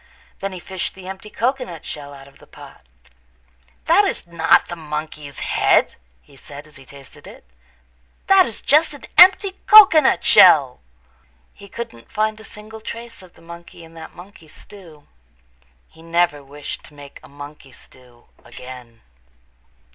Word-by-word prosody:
Then 195 0 -5
he 185 - -9
fished 185 +1 -6
the 190 -1 -13
empty 190 +2 -9
cocoanut 240 - -4
shell 145 -1 -9
out 135 -1 -14
of 140 - -21
the - - -19
pot. - - -16 1.0
"That - - +4
is - - -3
not 170 -1 +2
the 175 - -7
monkey's 150 -2 -8
head," - - +1 0.3
he - - -22
said 145 +2 -13
as 155 - -19
he 135 -1 -18
tasted 140 -2 -16
it, - - -15 0.8
"That 385 -1 +4
is 225 - -8
just 305 +1 +2
an 285 - -15
empty 380 +2 +5
cocoanut 370 -9 +6
shell." 140 -8 +5 0.7
He 200 - -16
couldn't 190 - -10
find 215 0 -2
a - - -14
single 215 +1 -13
trace 230 0 -10
of 185 -2 -18
the 165 - -22
monkey 170 0 -13
in 165 0 -16
that 160 -1 -13
monkey 180 -2 -16
stew. 160 -3 -17 0.8
He 160 - -21
never 165 -3 -1
wished 145 +1 -9
to 150 - -17
make 145 -1 -14
a - - -17
monkey 145 -1 -13
stew 125 -1 -20 0.2
again. 125 -2 -13
165 Hz, 155 wpm, -19 LUFS, 145-210 Hz, 1.0 s, cocoanut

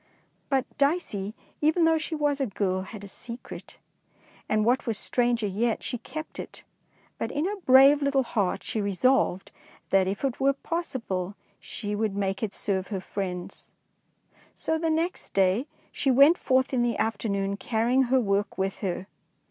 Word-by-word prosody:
^ - - -37 0.5
But 270 -1 +2
Dicey, 280 - 0 0.3
even 315 +3 +3
though 325 0 +4
she 320 +1 -4
was 290 -2 0
a 270 - +1
girl, 190 -2 -1
had 200 +2 -9
a - - -7
secret, 235 +5 -9 0.7
and, 215 0 +2
what 250 +2 +2
was 225 -3 0
stranger 240 -2 +1
yet, 215 +4 0
she 245 - -2
kept 310 +6 -7
it, - - -8 0.6
but - - -2
in 295 +3 -1
her 410 +2 -2
brave 270 +3 +7
little 280 -1 +2
heart 205 -6 -1
she 220 - -2
resolved 200 -1 +1 0.4
that 195 -1 +4
if 195 +6 -3
it 260 -3 -2
were 275 +1 +3
pos 335 +5 -4
sible 195 -6 -3 0.2
she 210 -2 -4
would 210 -1 -1
make 195 -1 -1
it 220 -3 -1
serve 190 -2 -1
her 200 -3 -3
friends. 180 -2 -5 0.8
So 320 0 -1
the 325 0 0
next 330 +3 -2
day 195 +8 +3 0.2
she 275 - 0
went 280 +6 +7
forth 260 0 +2
in 250 - +2
the 240 -1 +1
afternoon 200 -3 -1
carrying 240 +5 +1
her 260 +2 +3
work 200 -3 0
with 190 0 -2
her. 185 -2 -3
235 Hz, 170 wpm, -27 LUFS, 200-275 Hz, 0.8 s, brave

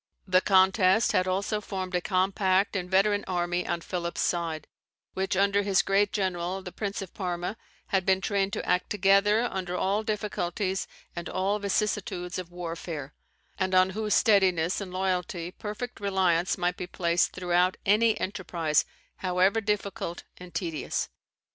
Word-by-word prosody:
The 185 0 +4
contest 190 +2 +4
had 185 - +2
also 200 +3 -1
formed 190 -2 -5
a 180 - +1
compact 190 +1 +1
and 180 -2 -2
veteran 205 +2 +3
army 175 0 -1
on 170 - -1
Philip's 170 -1 -3
side, 165 -3 -1 0.5
which, 190 0 -1
under 200 +1 +3
his 195 -1 +2
great 200 +1 +2
general, 185 -1 -2
the 180 - -7
Prince 200 0 -4
of 185 - -11
Parma, 180 0 -3 0.3
had 190 -2 +2
been 190 0 +3
trained 195 0 0
to - - -3
act 180 0 +1
together 205 +2 +4
under 180 -1 -3
all 200 +4 +1
difficulties 200 -3 -2 0.3
and 170 0 -5
all 195 +3 0
vicissitudes 195 -3 -1
of 180 -2 -7
warfare; 165 -4 -6 0.5
and 185 -1 +1
on 185 +1 +5
whose 210 0 0
steadiness 190 -5 +3
and 190 -2 -6
loyalty 180 -2 -2
perfect 215 +6 -6
reliance 190 -3 +1
might 180 -1 0
be 180 - -5
placed 175 -1 +1
throughout 180 0 +1
any 215 +2 +4
enterprise, 170 -6 0 0.3
however 185 +4 +2
difficult 200 -5 -2
and 180 -1 -12
tedious. 165 -4 -2
185 Hz, 150 wpm, -28 LUFS, 180-200 Hz, 0.5 s, on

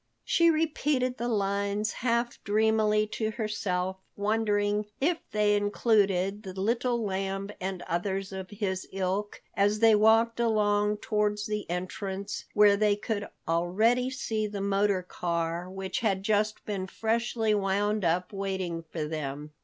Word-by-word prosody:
She 335 0 +4
repeated 300 -5 0
the 240 - -1
lines 200 0 0
half 235 0 -1
dreamily 215 0 +3
to 220 -1 -1
herself, 200 -4 -2 0.2
wondering 205 0 +1
if 330 +4 +1
they 210 -1 +3
included 205 -2 +2
the 190 -2 -7
Little 235 +3 0
Lamb 195 +1 -2
and 185 -1 -3
others 190 +3 -2
of 190 -1 -6
his 195 -3 -3
ilk, 195 +2 -2
as 205 +1 +2
they 225 0 +6
walked 225 +2 +4
along 210 -2 +2
towards 210 -1 0
the 210 -3 -3
entrance, 190 +3 -4
where 205 -1 +7
they 210 0 +3
could 205 0 -3 0.2
already 210 +10 +2
see 220 -4 -2
the 205 -1 -5
motor 200 -1 +1
car, 170 0 -2
which 190 0 -3
had 195 -4 0
just 210 +1 0
been 195 -3 -3
freshly 225 +1 0
wound 205 +1 +1
up, 175 +3 0
waiting 190 -4 -3
for 155 -3 -3
them. 150 -1 -5
205 Hz, 135 wpm, -28 LUFS, 190-220 Hz, 0.2 s, where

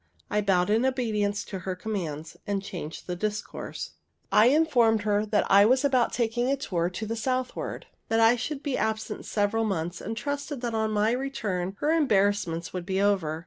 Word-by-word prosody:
I 210 - +2
bowed 195 -1 +2
in 225 +3 +3
obedience 215 -6 0
to 190 - -6
her 185 +1 -4
commands, 170 -6 -4
and 200 -1 -1
changed 165 -5 -7
the 180 - -3
discourse. 210 +3 -4 0.4
I 215 +2 +6
informed 245 -7 +3
her 210 0 +1
that 210 0 +2
I 200 +1 +7
was 255 +3 +3
about 255 -4 +3
taking 240 +1 0
a 275 - +2
tour 175 -10 -1
to 185 +5 -5
the 225 +1 -3
southward; 255 +2 -3 0.2
that 225 - +2
I 225 +2 +6
should 275 +4 -4
be 280 -3 -1
absent 220 0 -2
several 210 +2 +1
months, 175 -5 -2
and 225 +3 -5
trusted 285 +2 -3
that 240 -2 -2
on 220 -1 0
my 215 +1 +2
return 210 -8 -2
her 300 - +2
embarrassments 200 - +1
would 180 -1 -3
be 190 +1 -1
over. 190 -6 +1
215 Hz, 185 wpm, -27 LUFS, 195-245 Hz, 0.4 s, I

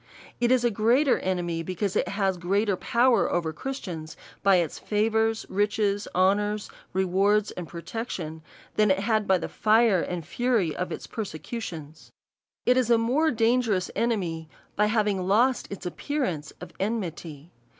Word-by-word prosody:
It 240 0 +2
is 255 -2 +4
a 240 - +3
greater 240 +7 +3
enemy, 175 -3 -2
because 185 +3 -3
it - - +1
has 195 -2 0
greater 200 +4 +1
power 235 +5 +2
over 165 -2 -1
Christians 175 - -6 0.2
by 195 -1 +5
its 170 -3 0
favours, 220 +1 +1
riches, 205 0 0
honours, 205 +3 +1 0.2
re 190 0 +1
wards, 200 +3 +2
and 175 -2 -7
protections, 170 -3 -6 0.4
than 210 -1 +4
it 190 0 +2
had 215 0 +1
by 190 - +4
the 175 - -4
fire 215 -3 +3
and 175 -3 -4
fury 220 -3 0
of 180 - -3
its - - -5
persecutions. 165 - -7 0.5
It 250 +1 +4
is 250 -2 +2
a 235 - +6
more 260 +8 +2
dangerous 225 -6 +1
enemy, 175 -9 -1 0.3
by 210 +1 +3
having 210 -4 0
lost 240 +6 +2
its 195 -2 -7
appeaiance 180 - -3
of 180 - -10
enmity. 175 -7 -4
205 Hz, 150 wpm, -26 LUFS, 180-225 Hz, 0.5 s, a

